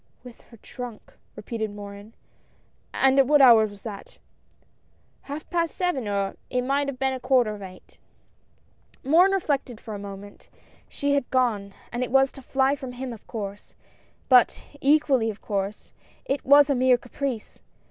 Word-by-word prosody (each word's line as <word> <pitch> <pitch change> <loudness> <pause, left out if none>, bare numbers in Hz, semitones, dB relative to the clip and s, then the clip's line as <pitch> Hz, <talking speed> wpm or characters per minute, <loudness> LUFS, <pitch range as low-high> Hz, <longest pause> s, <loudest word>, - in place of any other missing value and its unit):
" - - -41
With 245 -2 -13
her 230 - -15
trunk 240 0 -9
I - - -24
" - - -40
repeated 220 +1 -4
Morin, 205 +1 -10 0.2
— - - -38
" - - -40
and 270 0 +3
at 270 - +5
what 295 +1 +5
hour 230 -5 +7
was 205 -1 -14
that? 205 -4 -9 0.3
" - - -39
" - - -39
Half 295 +2 -6
past 335 -2 -1
seven, 355 - -1
or 200 -1 -2
it 250 -1 -1
might 280 +2 0
have 280 -2 -4
been 265 0 0
a 260 - -4
quarter 255 -4 +2
of 205 - -10
eight." 185 -1 -13 1.0
Morin 335 +8 +5
reflected 280 - -1
for 220 - -8
a 205 - -6
moment. 200 0 -10 0.4
She 285 0 -1
had 280 -3 0
gone, 215 -6 0 0.2
and 240 - -3
it 250 - -3
was 270 0 +4
to 270 - -12
fly 265 +2 +1
from 260 -3 -8
him 250 0 -6
of 220 - -14
course, 205 -3 -7 0.5
but, 250 -2 +4 0.2
equally 275 -5 +3
of 215 - -7
course, 200 0 -4 0.3
it 275 0 -2
was 285 +1 +6
a - - +4
mere 255 -1 +4
caprice. 245 -1 -5
250 Hz, 190 wpm, -25 LUFS, 210-275 Hz, 1.0 s, hour